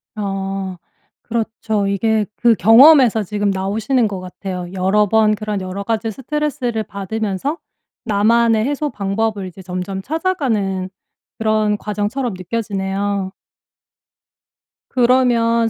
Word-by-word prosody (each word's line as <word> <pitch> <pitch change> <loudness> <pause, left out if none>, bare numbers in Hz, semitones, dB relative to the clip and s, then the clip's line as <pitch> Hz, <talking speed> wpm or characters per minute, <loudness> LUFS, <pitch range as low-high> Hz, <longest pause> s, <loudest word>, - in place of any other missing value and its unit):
어. 195 -2 -3 0.5
그렇죠. 220 -3 -2
이게 215 +2 +1
그 235 -1 +4
경험에서 235 - +7
지금 205 +1 -1
나오시는 215 +6 0
것 195 -2 -5
같아요. 180 0 -6
여러 195 +3 +2
번 215 +1 +3
그런 210 -1 -3
여러가지 200 +4 -3
스트레스를 265 -2 -2
받으면서 210 - -3 0.5
나만의 225 +1 +3
해소 290 +1 -1
방법을 205 -1 -2
이제 185 +1 -11
점점 185 +2 -4
찾아가는 235 - -1 0.5
그런 215 -1 +1
과정처럼 210 +3 -3
느껴지네요. 195 -1 -2 1.6
그러면 235 -2 +3
215 Hz, 265 characters per minute, -19 LUFS, 195-230 Hz, 1.6 s, 경험에서